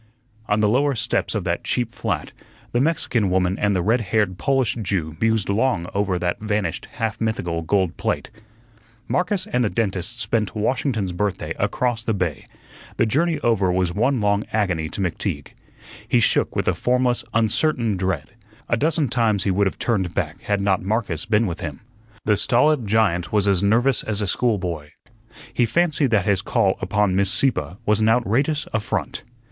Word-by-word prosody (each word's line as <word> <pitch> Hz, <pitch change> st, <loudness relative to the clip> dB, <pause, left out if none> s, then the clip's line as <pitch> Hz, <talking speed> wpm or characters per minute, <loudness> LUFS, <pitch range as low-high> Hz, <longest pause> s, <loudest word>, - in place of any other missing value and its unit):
On 105 Hz, +1 st, +1 dB
the 105 Hz, -, +4 dB
lower 135 Hz, +5 st, +2 dB
steps -, -, -1 dB
of -, -, -1 dB
that -, -, -2 dB
cheap 120 Hz, -2 st, -1 dB
flat, -, -, -3 dB, 0.4 s
the 120 Hz, -, +1 dB
Mexican 130 Hz, -, +1 dB
woman 90 Hz, +1 st, +1 dB
and 100 Hz, -1 st, +2 dB
the 90 Hz, -, 0 dB
red 115 Hz, +5 st, +2 dB
haired 95 Hz, -2 st, 0 dB
Polish 135 Hz, -4 st, +1 dB
Jew 90 Hz, -6 st, -2 dB
mused 110 Hz, -4 st, +2 dB
long 100 Hz, -3 st, +1 dB
over 100 Hz, -2 st, 0 dB
that 90 Hz, +2 st, -2 dB
vanished, 105 Hz, -6 st, -2 dB
half 110 Hz, 0 st, -3 dB
mythical 90 Hz, -7 st, -1 dB
gold 90 Hz, +1 st, 0 dB
plate. -, -, -2 dB, 0.8 s
Marcus 185 Hz, +1 st, 0 dB
and 125 Hz, -, +2 dB
the 105 Hz, -, +1 dB
dentist 105 Hz, +1 st, -2 dB
spent 110 Hz, -1 st, -1 dB
Washington's 110 Hz, -2 st, -1 dB
Birthday 100 Hz, +2 st, -2 dB
across 120 Hz, -3 st, 0 dB
the 110 Hz, -2 st, 0 dB
bay. 90 Hz, -6 st, -3 dB, 0.5 s
The -, -, +3 dB
journey 155 Hz, +7 st, +1 dB
over 100 Hz, -7 st, +2 dB
was 90 Hz, -1 st, 0 dB
one 125 Hz, +6 st, +1 dB
long 100 Hz, 0 st, +1 dB
agony 90 Hz, -7 st, 0 dB
to 100 Hz, -, -5 dB
McTeague. 90 Hz, -5 st, -3 dB, 0.6 s
He -, -, +3 dB
shook -, -, +2 dB
with -, -, -1 dB
a -, -, +3 dB
formless, 125 Hz, 0 st, +1 dB
uncertain 115 Hz, 0 st, +1 dB
dread; 95 Hz, +4 st, -2 dB, 0.4 s
a 115 Hz, -, +1 dB
dozen 155 Hz, +2 st, +1 dB
times 110 Hz, -5 st, +1 dB
he 100 Hz, -, +1 dB
would 100 Hz, +2 st, +2 dB
have -, -, -4 dB
turned 95 Hz, -8 st, -1 dB
back -, -, -2 dB
had 100 Hz, -1 st, -1 dB
not 100 Hz, -2 st, +1 dB
Marcus 100 Hz, -5 st, -2 dB
been 110 Hz, +1 st, +3 dB
with 85 Hz, -5 st, -4 dB
him. 75 Hz, -4 st, -5 dB, 0.5 s
The 105 Hz, -1 st, +3 dB
stolid 125 Hz, +1 st, +3 dB
giant 100 Hz, -5 st, +1 dB
was 105 Hz, -1 st, +2 dB
as 95 Hz, -3 st, +3 dB
nervous 120 Hz, +6 st, +3 dB
as 105 Hz, -2 st, -1 dB
a 105 Hz, -, 0 dB
schoolboy. 90 Hz, -8 st, -1 dB, 0.6 s
He 120 Hz, -, +2 dB
fancied 155 Hz, -1 st, +1 dB
that 105 Hz, -5 st, +2 dB
his 100 Hz, -3 st, +2 dB
call 105 Hz, -3 st, +1 dB
upon 100 Hz, 0 st, +1 dB
Miss 100 Hz, 0 st, +2 dB
Sieppe 125 Hz, -9 st, +1 dB
was 105 Hz, -1 st, +3 dB
an 110 Hz, -, +4 dB
outrageous 125 Hz, +6 st, +1 dB
affront. 110 Hz, -, -2 dB
105 Hz, 175 wpm, -22 LUFS, 95-120 Hz, 0.8 s, the